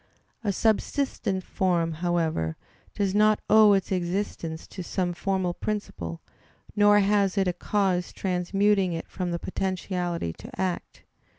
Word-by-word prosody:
A 205 - +1
subsistent 220 -2 0
form, 175 -4 0
however, 160 - -1 0.4
does 195 -2 0
not 215 +1 +4
owe 215 -1 +7
its 195 0 0
existence 175 -3 -2
to 185 - -8
some 175 0 -1
formal 185 0 -1
principle, 130 - -4 0.5
nor 205 0 +6
has 200 -1 +2
it 195 -1 +3
a 180 - +1
cause 190 -2 0
transmuting 195 +1 +1
it 165 - -5
from 180 -2 -4
potentiality 180 - -2
to - - -11
act. 185 -2 -3
185 Hz, 125 wpm, -26 LUFS, 175-205 Hz, 0.5 s, owe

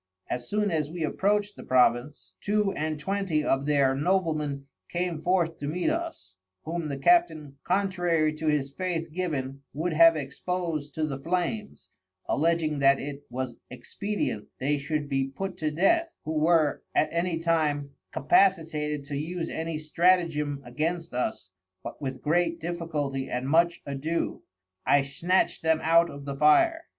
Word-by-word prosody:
As 120 -1 -3
soon 210 -1 +1
as 155 -3 0
we 170 0 -4
approached 205 +5 0
the - - -10
Province, 125 +2 +1
Two 210 -1 +1
and 155 -2 -3
Twenty 190 -2 -1
of 135 0 0
their 140 -3 +3
Noblemen 150 -3 0 0.2
came 175 -2 -2
forth 170 -2 +1
to 145 - -4
meet 180 - 0
us, 330 - -5 0.3
whom 165 0 -3
the 140 -2 -3
Captain 155 - +2
contrary 175 -5 +1
to 155 +1 -4
his 145 -2 +1
Faith 170 -2 -3
given, 140 -7 -3
would 165 +3 -1
have 165 +1 +7
expos'd 155 +1 -3
to 155 - 0
the 140 -3 -4
Flames, 180 +7 -3 0.4
alledging 160 -1 +1
that 140 0 +5
it 140 0 -6
was 125 -1 -4
expedient 200 - -4
they 145 +2 0
should 150 +1 -2
be 135 -1 0
put 190 +7 -5
to 155 -2 -1
Death, 330 - +2
who 155 - -2
were, 155 -1 +3
at 155 - +2
any 170 0 0
time, 155 -4 0 0.2
capacitated 150 -3 +2
to 145 0 -5
use 165 +4 -3
any 160 0 -3
Stratagem 155 -3 +1
against 165 +7 -3
us, 110 -6 -3 0.3
but - - -8
with 130 -2 -5
great 170 +2 +1
difficulty 155 -5 -3
and 125 +1 -2
much 170 +3 +3
adoe, 145 +4 -2 0.4
I 145 - +4
snatcht 170 +7 0
them 160 0 +2
out 170 +1 +5
of 140 0 -9
the 140 -1 -4
fire. 325 - +4
155 Hz, 155 wpm, -27 LUFS, 140-175 Hz, 0.4 s, have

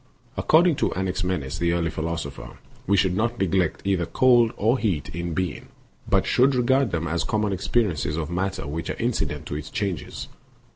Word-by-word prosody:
According 165 -1 +4
to - - +1
Anaxi 95 0 -2
menes, 80 -8 -2
the 85 0 +1
early 85 -1 0
philosopher, 80 -2 -5 0.3
we 100 +1 +3
should 95 -1 +2
not 120 +3 0
neglect 95 -3 0
either 95 -4 +1
cold 120 -3 +4
or 115 +5 +2
heat 90 - -1
in 85 0 -4
bemg 90 -6 -2 0.4
but - - +3
should 130 +2 +3
regard 130 +1 +3
them 85 0 -2
as 85 +1 0
common 105 -1 0
experiences 95 -6 0
of 80 0 -3
matter 95 0 -2
which 80 +4 -4
are - - -2
inci 115 -9 0
dent 75 +1 -7
to - - -5
its 75 0 -6
changes. 95 -7 -4
90 Hz, 185 wpm, -24 LUFS, 80-110 Hz, 0.4 s, According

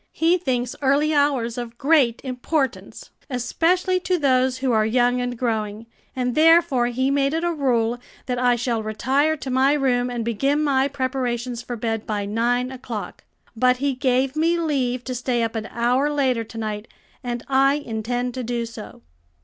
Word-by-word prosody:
He 330 +2 +3
thinks 250 -6 -2
early 285 +3 +2
hours 270 -5 +1
of 235 -1 -7
great 275 -5 +3
importance, 260 +1 -3 0.2
especially 355 +9 +1
to 365 0 0
those 260 -3 +2
who 260 -1 0
are 220 -2 +3
young 245 +2 +2
and 245 -1 -3
growing, 220 -2 -2 0.3
and 250 -1 -1
therefore 320 -4 +4
he 260 +3 0
made 280 +1 +1
it 325 - -1
a 345 0 0
rule 245 -5 0 0.3
that 250 -1 -2
I 245 -1 +3
shall 235 -1 -1
retire 265 +8 0
to 265 -1 -5
my 265 +2 +3
room 250 -4 +1
and 240 -2 -3
begin 275 +7 +1
my 275 -2 +2
preparations 255 -3 -2
for 245 - -6
bed 225 -1 -3
by 205 -2 -2
nine 240 +4 0
o'clock. 245 -5 -7 0.3
But 250 +2 +3
he 280 +1 0
gave 260 +1 0
me 330 +2 +2
leave 260 -7 -1
to 255 - -4
stay 245 -1 -1
up 225 - -2
an 220 -1 -3
hour 245 +5 +1
later 260 -5 +1
to 225 - -11
night, 215 -1 -4 0.4
and 240 -1 -4
I 275 +1 +3
intend 245 -2 -3
to 255 - -4
do 235 0 -2
so." 225 -2 -10
250 Hz, 175 wpm, -22 LUFS, 235-275 Hz, 0.4 s, therefore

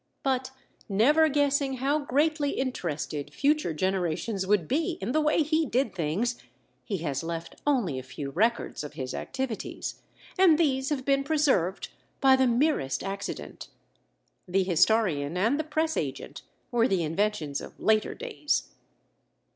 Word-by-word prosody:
But 260 -1 0 0.4
never 295 +11 +4
guessing 285 -1 +1
how 275 +4 +1
greatly 290 +1 +1
interested 155 - -3
future 290 - +1
generations 185 +3 -1
would 195 -6 +2
be 330 +5 0
in 195 +5 -3
the 310 - +2
way 305 +1 +3
he 315 +2 +1
did 245 -4 0
things, 190 +9 -1 0.4
he 200 - -3
has 140 -2 -1
left 165 0 -6
only 215 - +1
a - - -5
few 140 +2 -7
records 225 +1 0
of 150 - -7
his 130 -1 -5
activities 265 -5 -4 0.4
and 350 -5 +6
these 270 -5 +1
have 275 -4 -2
been 275 0 +2
preserved 275 - +1 0.3
by 265 -1 +6
the 260 0 +3
merest 235 - +1
accident. 195 +1 -5 0.8
The 190 +2 +2
historian 180 -4 +2
and 230 +10 +2
the - - +1
press 315 +1 -1
agent - - -4 0.3
were 240 -1 +3
the 190 -6 +1
inventions 160 -3 -1
of - - -11
later 215 0 +2
days. 430 -12 -2
235 Hz, 145 wpm, -27 LUFS, 175-285 Hz, 0.8 s, and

